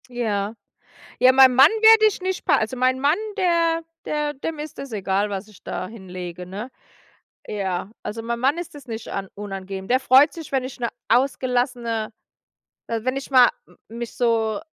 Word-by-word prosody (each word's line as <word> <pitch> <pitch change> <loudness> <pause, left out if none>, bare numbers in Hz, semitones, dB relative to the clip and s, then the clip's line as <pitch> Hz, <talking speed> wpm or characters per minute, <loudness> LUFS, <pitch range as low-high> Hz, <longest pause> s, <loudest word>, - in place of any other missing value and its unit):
Ja. 220 -3 -2 0.6
Ja, 255 +1 +6
mein 260 -1 +7
Mann 270 +4 +8
werde 440 0 +8
ich 425 - 0
nicht 375 0 -3
pa 295 - +4
also 220 +1 -2
mein 255 +1 +1
Mann, 290 +6 +3 0.2
der 335 -3 +2 0.2
der 300 -1 -2
dem 300 +3 -5
ist 305 +1 -7
es 275 -3 -7
egal, 200 0 -1
was 200 +1 -5
ich 210 - -18
da 185 - -4
hinlege, 180 -4 -8
ne? 205 +7 -7 0.8
Ja, 190 -2 -3
also 225 +2 -5
mein 235 +1 -3
Mann 275 +6 +2
ist 345 -2 -7
das 285 -3 -12
nicht 225 -2 -6
an 195 -1 -4
unangenehm. 195 -1 -7
Der 255 +1 +3
freut 270 +3 +5
sich, 325 -2 -10
wenn 265 -2 +1
ich 255 - -8
'ne 235 - 0 0.2
ausgelassene 245 -3 0 0.8
äh, 230 -1 -2
wenn 255 +1 -1
ich 275 - -6
mal 255 -2 +7 0.2
m - - -21 0.2
mich 235 -1 -6
so 225 -2 +1
245 Hz, 185 wpm, -23 LUFS, 210-275 Hz, 0.8 s, Mann